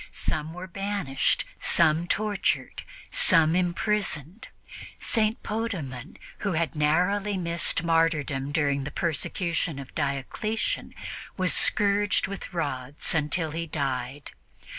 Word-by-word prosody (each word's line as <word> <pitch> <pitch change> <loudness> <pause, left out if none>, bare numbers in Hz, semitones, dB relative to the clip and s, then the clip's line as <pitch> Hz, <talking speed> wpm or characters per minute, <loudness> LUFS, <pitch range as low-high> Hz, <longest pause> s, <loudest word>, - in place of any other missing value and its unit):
Some 155 +1 -2
were 180 +2 -7
banished, 190 -8 0
some 165 0 +3
tortured, 210 +1 0 0.3
some 165 -3 +6
imprisoned. 180 - 0 0.5
St. 220 -1 0
Potamon, 175 - -4 0.2
who 200 -3 -1
had 165 0 -1
narrowly 180 +7 +2
missed 170 -1 +1
martyrdom 155 -4 +1
during 140 -3 +1
the 140 - -4
persecution 165 0 -1
of 140 -1 -9
Diocletian, 155 - -2 0.4
was 185 -1 +2
scourged 205 -1 +3
with 200 0 -7
rods 145 -5 -1
until 160 +1 0
he 165 +2 -3
died. 135 -2 -3
165 Hz, 105 wpm, -27 LUFS, 145-195 Hz, 0.5 s, some